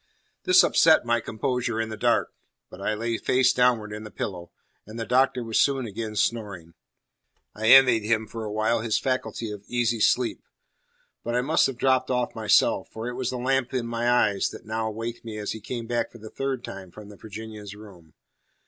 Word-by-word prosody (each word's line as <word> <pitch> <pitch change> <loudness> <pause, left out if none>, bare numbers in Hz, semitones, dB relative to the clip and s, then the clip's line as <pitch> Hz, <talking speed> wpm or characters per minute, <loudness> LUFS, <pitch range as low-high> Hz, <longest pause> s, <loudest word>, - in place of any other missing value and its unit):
This 370 0 +7
upset 160 -5 +4
my 120 0 +2
composure 120 +1 -2
in 110 0 -2
the 110 - -5
dark; - - +1 0.4
but 95 - -11
I 110 +2 -1
lay 115 +1 -2
face 130 0 +3
downward 120 -4 +2
in 105 0 -7
the 105 - -8
pillow, 90 -4 -6 0.4
and 110 +2 -8
the 115 - -3
Doctor 125 0 +2
was 115 -1 0
soon 135 -3 +1
again 110 0 -5
snoring. 100 -7 -2 0.8
I 110 +1 -3
envied 125 -2 +7
him 110 0 +1
for 115 +1 -7
a 105 - -5
while 110 +2 +1
his 110 -1 0
faculty 130 -4 -2
of 105 -1 -8
easy 120 -1 0
sleep. 120 +3 +1 0.8
But 120 +1 -2
I 125 - +2
must 150 +5 +3
have 135 -3 -6
dropped 130 +1 +2
off 125 -1 -1
myself; 110 -2 +2
for 110 +2 -6
it - - -5
was 125 -1 -3
the 125 - -3
lamp 130 +1 0
in 125 -2 -1
my 120 +1 -1
eyes 105 -5 +2
that - - -11
now 110 +1 -2
waked 115 +2 -6
me 110 -2 -7
as 105 -1 -3
he 110 - -7
came 115 +2 -5
back 120 0 -2
for - - -13
the 110 -1 -11
third 135 -2 -3
time 95 -5 -8
from 105 +3 -12
the 105 - -12
Virginian's 105 -1 -9
room. 95 -7 -15
115 Hz, 205 wpm, -25 LUFS, 105-125 Hz, 0.8 s, This